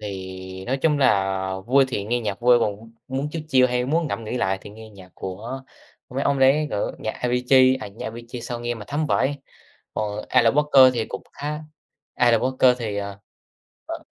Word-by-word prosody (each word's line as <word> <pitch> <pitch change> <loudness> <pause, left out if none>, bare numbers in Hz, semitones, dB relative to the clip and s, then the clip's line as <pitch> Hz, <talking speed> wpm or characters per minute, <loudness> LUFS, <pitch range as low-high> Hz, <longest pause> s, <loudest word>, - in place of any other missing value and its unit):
thì 95 -2 -7
nói 135 +2 0
chung 150 -3 +3
là 95 -7 +3 0.3
vui 135 +2 +5
thì 100 -6 -3
nghe 120 +3 0
nhạc 105 -2 -4
vui, 120 0 +6
còn 105 -3 0
m 115 0 -14 0.3
muốn 140 +2 -1
chill 160 0 -5
chill 130 -2 +5
hay 125 0 0
muốn 160 +4 +1
ngẫm 110 +3 -4
nghĩ 110 - -3
lại 95 -5 0
thì 100 - -11
nghe 110 +1 -12
nhạc 95 -3 -14
của 110 +8 -6 0.5
mấy 135 +2 -3
ông 140 -1 +1
đấy, 135 +3 +4
kiểu, 100 - -2
nhạc 110 - -3
Avicii, 125 +1 +4
à, - - -7
nhạc 100 +3 -10
Avicii 120 +2 -7
sao 120 0 -5
nghe 120 0 -2
mà 110 -3 -9
thấm 150 +2 -1
vãi, 145 0 +1 0.5
ồ, 105 0 -3
Alan 115 +2 +4
Walker 140 -3 +6
thì 115 -2 0
cũng - - -6
khá 150 +1 -4 0.6
Alan 120 -2 +4
Walker 130 -1 +3
thì, 110 -4 -3
ờ, 100 -1 -5 0.7
ờ. - - -6
120 Hz, 205 wpm, -23 LUFS, 105-135 Hz, 0.7 s, vui